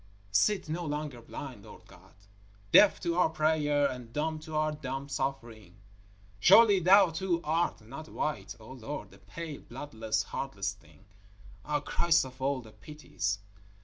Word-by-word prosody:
_ - - -29 0.3
Sit 190 - +2
no 165 +3 -3
longer 150 -5 -4
blind, 120 -2 -8
Lord - - -14
God, - - -18 0.6
deaf 205 - +7
to 170 -2 -1
our 180 - +4
prayer 155 -2 +2
and 125 -3 -7
dumb 155 +4 -2
to 155 0 -8
our 155 0 +1
dumb 135 -2 -5
suffering. 120 -9 -4 0.6
Surely 200 - +7
Thou 185 +1 +6
too 175 0 -1
art 165 -3 0
not 140 +9 -10
white, 105 -11 -3
O 110 +3 -12
Lord, 135 +3 -7
a - - -17
pale, 165 -4 -8
bloodless, 115 -4 -3
heartless 100 -8 -4
thing? 80 -6 -22 0.6
_Ah! 150 -1 -2
Christ 165 -4 +3
of 130 0 -12
all 135 0 0
the 110 -2 -14
Pities! 105 - -4
145 Hz, 155 wpm, -30 LUFS, 120-160 Hz, 0.6 s, deaf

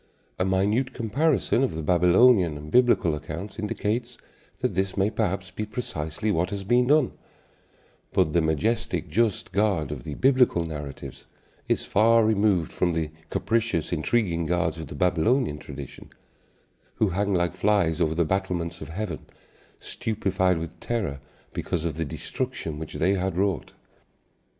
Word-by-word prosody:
A 90 - +2
minute 105 +8 +1
comparison 130 +3 +1
of 130 -11 0
the 80 - -4
Babylonian 90 +1 +4
and 75 +1 -9
Biblical 120 -10 +4
accounts 80 +8 -6
indicates 115 +3 -2 0.4
that - - 0
this 95 +1 -1
may 100 +2 +2
perhaps 95 -3 -2
be 105 - -4
precisely 105 -3 -3
what 90 -1 0
has 100 -1 -4
been 120 +4 +3
done; 150 -2 +4 1.0
but 75 - +2
the 85 - +4
majestic, 80 +9 0
just 115 -4 0
God 95 -8 +1
of 70 -4 -5
the 75 - -6
Biblical 130 -10 +3
narratives 75 -3 -7 0.4
is - - 0
far 115 +2 +4
removed 100 -6 +2
from 90 -1 0
the 80 -2 -2 0.2
capricious, 115 -8 0
intriguing 85 -9 0
gods 85 -1 0
of 80 - -6
the - - -8
Babylonian 90 - +1
tradition, - - -9 0.9
who 110 - +2
hang 100 +2 0
like 85 -2 +1
flies 100 -7 +1
over 80 0 +1
the 85 0 +2
battlements 90 -2 -2
of - - -7
heaven, 95 +3 -5 0.5
stupefied 95 -6 0
with 80 +1 -6
terror 100 -13 -2 0.3
because 85 -3 -2
of 85 - -1
the 80 - -1
destruction 75 +2 -4
which 80 - -7
they 95 +4 +2
had 95 -2 -1
wrought. 95 -1 -1
95 Hz, 150 wpm, -26 LUFS, 80-110 Hz, 1.0 s, Babylonian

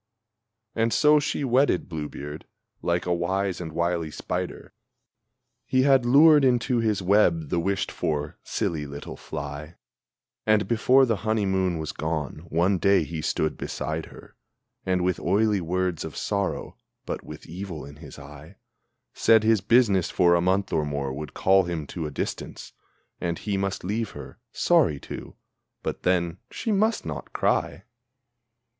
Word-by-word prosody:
And 115 0 +1
so 150 +3 +5
she 145 - -2
wedded 130 -6 +2
Blue 75 -4 -5
beard 75 +2 -8 0.3
like 85 0 0
a 90 - +1
wise 95 +2 -1
and 80 -2 -5
wily 85 0 -1
spider - - -5 0.9
He 130 0 +2
had 135 -3 +4
lured 150 +3 +7
into 125 -1 +2
his 105 -4 0
web 90 -6 +3
the - - +1
wished 95 +3 -1
for, 75 -1 -3
silly 75 -3 -2
little 70 +1 -8
fly! 75 +4 -7 0.7
And, 110 -1 +2
before 130 +3 +4
the 115 -4 0
honeymoon 95 -5 0
was 80 -1 -4
gone, 80 +1 -4
one 90 +4 +2
day 100 +1 +4
he 80 -2 -5
stood 80 0 -1
beside 80 0 -4
her, - - -15 0.5
And 90 -1 +1
with 90 -1 0
oily 105 +2 +2
words 90 0 -1
of - - -7
sorrow, 100 -2 -2 0.3
but - - -4
with 75 0 -10
evil 85 -2 -7
in 70 0 -12
his 75 -3 -11
eye, 75 +5 -12 0.6
Said 110 -1 +4
his 110 -2 +3
business 105 -4 +3
for 85 -1 +4
a 85 - +3
month 95 +2 +1
or 75 - +2
more 70 -2 -3
would 75 +1 -7
call 95 0 +4
him 85 -3 -3
to 80 +2 -5
a - - -5
distance, 70 - -5 0.5
And 85 -1 -2
he 105 -2 -3
must 95 0 -2
leave 110 +4 -2
her 65 -3 -10
sorry 70 - +3
to - - -8 0.5
but - - -4
then, 90 -1 0
she 225 - -3
must 215 +2 +1
not 75 -3 -6
cry! - - 0
90 Hz, 155 wpm, -25 LUFS, 80-110 Hz, 0.9 s, lured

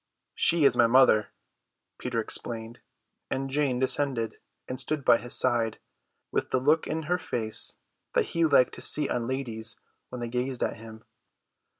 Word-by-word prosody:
"She 165 -3 +2
is - - +5
my 120 - +5
mother," 115 -4 +5 0.7
Peter 125 -2 -2
explained; 115 +1 -3 0.5
and 135 0 -3
Jane 140 -3 +1
descended 130 -3 0 0.3
and 130 0 -5
stood 150 -3 -3
by 120 - +6
his 120 0 -4
side, 120 -3 +1 0.5
with - - -1
the 130 - +1
look 150 +5 +2
in 160 0 -3
her 180 +4 0
face 110 -9 -1 0.4
that - - +3
he 170 - +2
liked 140 -5 +4
to - - -8
see 150 -2 +2
on 120 -1 -2
ladies 115 -4 -3 0.3
when 125 - -7
they 120 - -3
gazed 125 +1 -2
at - - -2
him. 110 0 -12
125 Hz, 165 wpm, -27 LUFS, 115-140 Hz, 0.7 s, by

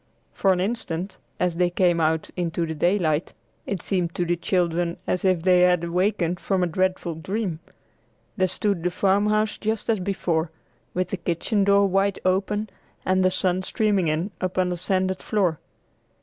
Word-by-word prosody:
For 195 - +2
an 180 - +1
instant, 190 -3 -3 0.2
as 180 -2 0
they 180 0 +3
came 175 -1 +2
out 160 0 0
into 170 -1 -1
the 160 - -4
daylight, 165 -1 +1 0.3
it 195 -4 -3
seemed 180 -4 -1
to 175 - 0
the 175 +1 +1
children 170 -1 0
as 180 - -1
if 185 -4 +2
they 180 -1 +5
had 180 -1 +4
awakened 180 0 0
from 190 -2 0
a - - +3
dreadful 185 0 -1
dream. 185 +1 -3 0.8
There 185 - +2
stood 195 0 -1
the 180 - +1
farmhouse 205 +3 +1
just 220 +1 -1
as 220 - 0
before, 175 -4 -1 0.5
with 180 0 0
the 195 - -2
kitchen 180 +4 0
door 200 0 +5
wide 195 +1 +1
open 200 +3 0 0.3
and 185 0 +2
the 185 - +5
sun 185 0 0
streaming 200 -2 +1
in 160 +6 -1
upon 185 0 0
the 180 - -2
sanded 185 +1 -1
floor. 185 -7 0
185 Hz, 170 wpm, -24 LUFS, 175-195 Hz, 0.8 s, they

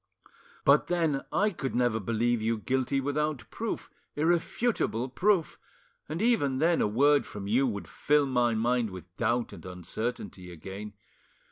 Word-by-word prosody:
"But - - +5
then 165 -6 0
I 210 +1 +2
could 135 -7 -4
never 120 -2 +2
believe 115 +3 0
you 115 +1 +1
guilty 130 +4 0
without 145 +1 -1
proof, - - -4 0.2
irrefutable 165 - 0
proof; 180 +4 +1 0.5
and 165 +7 -2
even 145 - +2
then 165 +4 +3
a - - +3
word 140 +7 +4
from 100 -1 -7
you 125 +7 +2
would 100 -4 -4
fill 150 0 +2
my 125 -3 +2
mind 120 +1 +1
with 90 -1 -11
doubt 120 +2 0
and - - -11
uncertainty 90 +1 -5
again. 95 +5 -8
125 Hz, 145 wpm, -29 LUFS, 110-150 Hz, 0.5 s, But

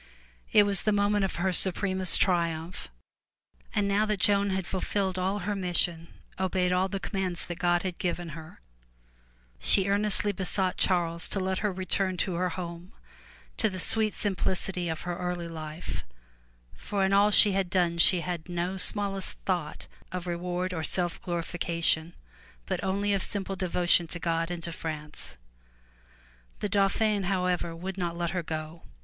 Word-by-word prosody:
It 210 - +7
was 200 -1 +3
the 215 - +1
moment 205 0 +2
of 190 - -4
her 185 +2 0
supremest 185 0 +3
triumph. 170 -2 0 0.9
And 205 -2 +2
now 205 +2 +2
that 210 -2 -1
Joan 200 +1 +3
had 190 -1 -1
fulfilled 190 0 -2
all 190 +2 0
her 205 0 -1
mis 180 -3 -1
sion, 170 -1 +1 0.3
obeyed 185 -1 +1
all 180 +1 +2
the 195 0 -4
commands 190 -3 -2
that 175 0 -7
God 175 -1 +2
had 185 -2 -4
given 175 -1 -2
her, 160 - -11 1.0
she 195 -1 +4
earnestly 205 0 +2
besought 190 -1 -1
Charles 170 -2 +1
to 195 - -1
let 190 0 -1
her 210 -1 0
return 185 0 0
to 180 +1 -1
her 180 +1 0
home 175 +2 -7 0.6
to 220 - +2
the 185 -1 -6
sweet 215 +3 +4
simplicity 185 -2 0
of 160 -1 -4
her 175 0 -4
early 180 -1 -3
life, 155 -1 -6 0.7
for 200 -2 -1
in 190 - +1
all 200 +1 +5
she 210 0 +7
had 190 -2 0
done 175 -2 +1
she 175 +1 +6
had 175 -1 -5
no 175 +2 -2
smallest 195 0 +1
thought 175 -5 -2 0.2
of 180 -1 -4
reward 180 +1 -3
or 165 - -3
self 175 0 -1
glorification, 170 -1 0 0.5
but - - -3
only 200 +1 0
of 195 - 0
simple 195 0 -2
devotion 180 -2 +3
to 175 - -5
God 165 -1 -1
and 175 -1 -5
to 170 - -4
France. 155 -2 -7 1.2
The 205 - -2
Dauphin 200 0 +1
however 180 -3 -1
would 190 +3 -6
not 170 -1 -2
now - - -8
let 170 -1 -1
her 180 - -1
go. 160 0 -6
180 Hz, 165 wpm, -28 LUFS, 170-195 Hz, 1.2 s, It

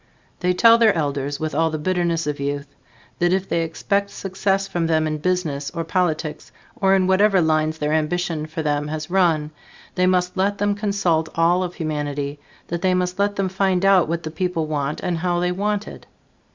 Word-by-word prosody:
They 180 0 +1
tell 230 +4 +6
their 220 -3 +5
elders 145 -2 -2
with 155 0 -3
all 165 0 +2
the 155 - -3
bitterness 170 0 0
of 150 -1 -3
youth 140 0 -2 0.5
that 175 0 +2
if 190 0 0
they 170 - 0
expect 200 +5 -1
success 195 0 -1
from 170 -3 -1
them 160 -1 +2
in 155 -1 -2
business 155 -5 -1
or 165 - -1
politics 165 -3 -2 0.2
or 195 0 +3
in 190 -1 +2
whatever 195 +1 +4
lines 155 -1 +1
their 150 0 -1
ambition 160 0 -1
for 155 +1 -5
them 150 -1 0
has 155 +2 -5
run, 165 -5 +2 0.4
they 180 0 +2
must 180 -1 +1
let 200 +2 +1
them 205 0 +1
consult 200 -6 0
all 170 +2 +3
of 180 -1 -4
humanity; 145 -3 -3 0.3
that 170 0 -3
they 185 -1 +2
must 180 +1 -1
let 205 0 +1
them 195 -1 0
find 190 0 +1
out 195 -4 +5
what 170 0 -2
the 155 - -5
people 170 -1 -1
want 150 -1 -2
and 175 -2 -2
how 175 0 0
they 180 0 0
want 205 +3 -1
it. - - -11
175 Hz, 200 wpm, -22 LUFS, 155-190 Hz, 0.5 s, tell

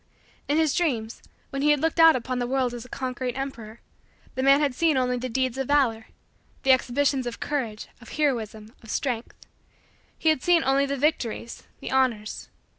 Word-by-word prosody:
In 290 - +1
his 315 -3 +2
dreams, 240 -10 -1 0.3
when 275 - -3
he 295 - +3
had 295 -1 +4
looked 325 +3 0
out 325 -1 +8
upon 255 0 -2
the 245 - -1
world 255 -1 0
as 240 -1 -6
a 250 - -14
conquering 255 -1 -4
emperor, 235 -5 -6 0.5
the 260 - -2
man 275 +1 +6
had 290 -3 +1
seen 315 +1 +2
only 250 -1 +1
the 255 +1 -4
deeds 260 +1 -1
of 270 - -2
valor 250 -6 +2 0.6
the 270 - +5
exhibitions 260 +1 +2
of 240 - -6
courage, 235 -8 -3
of 240 - -13
heroism, 225 -7 -2
of 225 - -14
strength 240 -2 -3 0.8
he 320 - +2
had 310 -5 +2
seen 350 -2 +3
only 270 +1 +2
the 280 0 -2
victories 250 -5 -2
the - - -6
honors. 245 -5 0
260 Hz, 190 wpm, -25 LUFS, 240-285 Hz, 0.8 s, out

